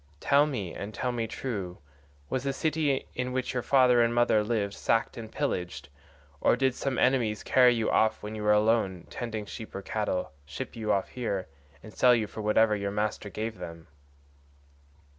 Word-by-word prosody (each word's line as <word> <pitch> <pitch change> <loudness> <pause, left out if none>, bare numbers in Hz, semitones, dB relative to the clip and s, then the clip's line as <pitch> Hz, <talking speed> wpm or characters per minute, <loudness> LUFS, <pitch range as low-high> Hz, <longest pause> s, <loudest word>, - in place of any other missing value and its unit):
Tell 145 - +4
me, 105 - -4
and 100 +1 -7
tell 125 +5 -1
me 115 -2 -2
true, 100 -8 -4 0.5
was 130 - -2
the 140 -1 -1
city 155 -2 0
in 125 0 -3
which 130 0 -2
your 125 - -1
father 125 -2 +4
and 115 0 +2
mother 120 -3 +3
lived 105 -3 -1
sacked 115 +2 0
and 110 -1 -8
pillaged, 90 - -3 0.5
or - - +4
did 130 +1 +1
some 135 +1 -2
enemies 120 -5 +2
carry 125 -2 +5
you 115 -1 0
off 110 0 +2
when 105 +1 -5
you 110 - -5
were 105 0 +3
alone 105 -4 +2
tending 110 -3 -4
sheep 110 +2 -9
or 95 - -5
cattle, 105 -4 -2
ship 70 +1 -7
you 110 -2 -1
off 100 -2 0
here, 100 -7 -3 0.4
and 110 - -11
sell 125 -1 +5
you 110 -2 0
for 110 - -8
whatever 105 +1 +3
your 100 -1 -2
master 105 0 -2
gave 110 0 -5
them?" 85 -2 -8
110 Hz, 185 wpm, -28 LUFS, 105-125 Hz, 0.5 s, carry